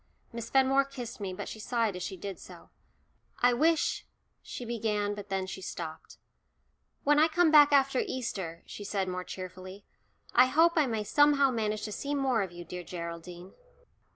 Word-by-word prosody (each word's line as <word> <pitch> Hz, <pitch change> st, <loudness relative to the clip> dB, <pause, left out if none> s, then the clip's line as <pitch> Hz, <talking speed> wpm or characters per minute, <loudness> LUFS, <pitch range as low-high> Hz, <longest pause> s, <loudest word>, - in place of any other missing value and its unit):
Miss 230 Hz, -1 st, -6 dB
Fenmore 270 Hz, +1 st, +4 dB
kissed 250 Hz, -5 st, -8 dB
me, 195 Hz, -2 st, -4 dB
but 185 Hz, -, -6 dB
she 220 Hz, -, -7 dB
sighed 230 Hz, -3 st, 0 dB
as 180 Hz, -, -6 dB
she 190 Hz, -, -5 dB
did 195 Hz, +1 st, -6 dB
so. -, -, -13 dB, 0.7 s
"I 245 Hz, 0 st, +6 dB
wish 315 Hz, +6 st, +1 dB, 0.2 s
" -, -, -47 dB
she 245 Hz, -, -7 dB
began, 210 Hz, -3 st, -1 dB
but 205 Hz, 0 st, -8 dB
then 190 Hz, -1 st, -1 dB
she 190 Hz, 0 st, -7 dB
stopped. 160 Hz, -3 st, -7 dB, 0.9 s
"When 295 Hz, +1 st, +4 dB
I 310 Hz, -, +6 dB
come 330 Hz, 0 st, +3 dB
back 295 Hz, -1 st, +8 dB
after 275 Hz, -2 st, +3 dB
Easter," 190 Hz, -9 st, -4 dB
she 205 Hz, -, -8 dB
said 195 Hz, -2 st, -2 dB
more 180 Hz, 0 st, -3 dB
cheerfully, 185 Hz, +2 st, -9 dB, 0.5 s
"I 250 Hz, +1 st, +6 dB
hope 325 Hz, +5 st, +4 dB
I 310 Hz, -4 st, +3 dB
may 220 Hz, -3 st, -2 dB
somehow 285 Hz, +4 st, +4 dB
manage 215 Hz, -3 st, -2 dB
to 215 Hz, -, -4 dB
see 285 Hz, +7 st, -3 dB
more 265 Hz, -5 st, +1 dB
of 190 Hz, -3 st, -3 dB
you, 175 Hz, 0 st, -9 dB
dear 180 Hz, +1 st, -6 dB
Geraldine." 175 Hz, +1 st, -8 dB
220 Hz, 180 wpm, -30 LUFS, 185-270 Hz, 0.9 s, back